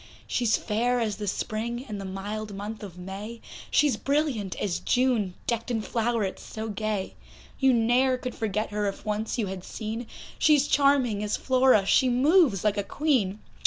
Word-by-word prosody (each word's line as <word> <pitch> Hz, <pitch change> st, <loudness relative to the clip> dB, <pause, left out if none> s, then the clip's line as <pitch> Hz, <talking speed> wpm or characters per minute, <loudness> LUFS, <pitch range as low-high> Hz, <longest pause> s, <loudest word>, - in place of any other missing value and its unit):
She's 235 Hz, -3 st, +1 dB
fair 240 Hz, +3 st, 0 dB
as 215 Hz, -4 st, -1 dB
the 210 Hz, -1 st, -5 dB
Spring 235 Hz, +5 st, -3 dB
in 210 Hz, -2 st, -5 dB
the 195 Hz, -, -6 dB
mild 205 Hz, +2 st, -5 dB
month 210 Hz, +2 st, -6 dB
of 190 Hz, -4 st, -9 dB
May, 195 Hz, +5 st, -7 dB, 0.3 s
She's 295 Hz, -3 st, +3 dB
brilliant 275 Hz, -9 st, 0 dB
as 190 Hz, -4 st, -2 dB
June 240 Hz, -7 st, +1 dB
decked 235 Hz, 0 st, -2 dB
in 225 Hz, -3 st, -1 dB
flowerets 225 Hz, -4 st, -1 dB
so 220 Hz, 0 st, -6 dB
gay; 210 Hz, -2 st, -2 dB, 0.5 s
You 270 Hz, -1 st, +5 dB
ne'er 250 Hz, +2 st, +3 dB
could 250 Hz, -1 st, -5 dB
forget 215 Hz, 0 st, -2 dB
her 210 Hz, 0 st, -1 dB
if 195 Hz, -, -5 dB
once 215 Hz, +2 st, -2 dB
you 225 Hz, -, 0 dB
had 190 Hz, -1 st, -6 dB
seen, 225 Hz, +3 st, -5 dB, 0.3 s
She's 295 Hz, -2 st, +4 dB
charming 275 Hz, -7 st, +3 dB
as 210 Hz, 0 st, -1 dB
Flora, 255 Hz, -6 st, +4 dB
she 255 Hz, +6 st, +4 dB
moves 265 Hz, -, +4 dB
like 210 Hz, -1 st, +1 dB
a 205 Hz, -, 0 dB
Queen. 215 Hz, -7 st, 0 dB
220 Hz, 170 wpm, -27 LUFS, 205-250 Hz, 0.5 s, You